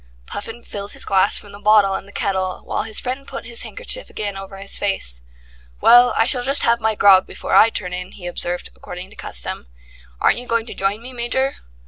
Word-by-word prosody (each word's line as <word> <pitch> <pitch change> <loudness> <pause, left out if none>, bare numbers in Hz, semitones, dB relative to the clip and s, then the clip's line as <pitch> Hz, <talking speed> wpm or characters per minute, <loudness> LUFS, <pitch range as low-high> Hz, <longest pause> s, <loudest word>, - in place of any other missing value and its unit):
Puffin 225 - -6
filled 200 0 -6
his - - -1
glass 195 +1 +3
from 205 - -8
the 200 - -10
bottle 210 -2 +4
and 190 - -4
the - - -13
kettle, 190 -2 -1
while - - -1
his 220 -1 +2
friend 260 +2 -4
put - - -7
his 235 0 -4
handkerchief - - -5
again 205 -2 -3
over 195 0 -8
his 195 +1 -4
face. 65 - -2 0.6
"Well, 245 +1 +7
I 225 - +4
shall 250 0 +1
just 275 +3 +2
have 235 0 +3
my 220 0 +1
grog 195 -2 +6
before - - -5
I 225 - +7
turn 180 -5 -4
in," 180 +1 -5
he 180 - -10
observed, 175 0 -2
according 180 +1 -9
to - - -14
custom. - - -5 0.5
"Aren't - - +3
you 245 - -8
going 230 -1 +1
to - - -8
join 200 +3 -1
me, 255 +1 -6
Major?" 255 +3 -1
205 Hz, 215 wpm, -20 LUFS, 195-235 Hz, 0.6 s, Well